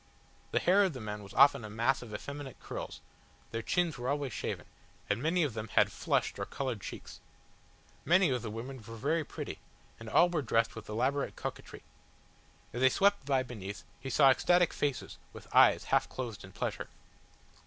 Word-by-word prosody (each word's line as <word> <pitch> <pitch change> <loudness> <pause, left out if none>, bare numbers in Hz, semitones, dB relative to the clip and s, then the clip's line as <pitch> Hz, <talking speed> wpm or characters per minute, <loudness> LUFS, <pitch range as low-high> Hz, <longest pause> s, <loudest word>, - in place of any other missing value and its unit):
The - - -1
hair 195 +3 +5
of 190 -4 +1
the 130 - -7
men 105 -2 -5
was 100 -1 -12
often 140 -3 +6
a 105 - -6
mass 115 +5 +1
of 120 -3 -10
effeminate 140 +5 -7
curls, - - -7 0.5
their 115 - -2
chins 170 +2 0
were 125 +1 -2
always 140 -4 -1
shaven, - - -4 0.4
and 105 +3 0
many 165 +4 +2
of 145 -6 -1
them 110 0 -5
had - - +5
flushed - - -1
or - - -2
coloured 130 -7 -3
cheeks. - - -8 0.8
Many 175 -2 +4
of 125 -2 0
the 115 - -5
women 120 +5 -6
were 115 -1 -10
very 150 +8 0
pretty, - - -7 0.4
and 115 -1 -8
all 175 - +6
were 170 -3 -1
dressed 115 -2 +1
with 115 -2 -9
elaborate 130 +6 0
coquetry. - - -7 0.9
As 120 - -3
they 130 - +7
swept 200 -2 +2
by 135 -2 +2
beneath, 105 -5 -7 0.2
he 135 - -6
saw 135 +1 +6
ecstatic 175 +5 +3
faces 145 -3 -2
with - - -11
eyes - - +6
half - - +1
closed 120 -5 -6
in 95 - -11
pleasure. - - -3
130 Hz, 185 wpm, -31 LUFS, 115-145 Hz, 0.9 s, they